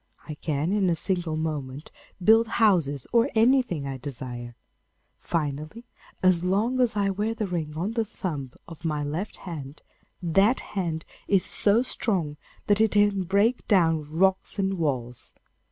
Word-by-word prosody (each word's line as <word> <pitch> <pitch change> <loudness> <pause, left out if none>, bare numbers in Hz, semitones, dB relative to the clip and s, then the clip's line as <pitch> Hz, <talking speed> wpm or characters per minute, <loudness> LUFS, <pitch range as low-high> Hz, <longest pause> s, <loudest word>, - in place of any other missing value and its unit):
I 155 - -5
can 150 +2 -2
in 200 -3 +2
a 170 - +2
single 170 -2 -2
moment 150 -3 -4 0.3
build 225 +3 +6
houses 170 - +2
or 235 +3 +4
anything 230 - +3
I 135 -1 -4
desire. 120 -2 -6 0.6
Finally, 155 - -3 0.4
as 180 -2 +4
long 210 +8 +1
as 240 -4 +2
I 200 -1 +2
wear 210 +4 -2
the 220 - -2
ring 160 -5 -4
on 185 +6 -1
the 230 0 0
thumb 155 - -5 0.2
of 165 -1 -11
my 150 -3 -1
left 160 +8 -4
hand, 150 -5 -7 0.4
that 195 +8 +3
hand 170 -5 -2 0.2
is 195 -3 +3
so 215 +4 +2
strong 175 -12 -1 0.3
that 205 +1 +3
it 220 - +3
can 205 -2 +3
break 205 +7 +1
down 165 -6 +3
rocks 190 +5 +3
and 195 -2 -1
walls. 125 -6 -2
180 Hz, 155 wpm, -26 LUFS, 150-205 Hz, 0.6 s, build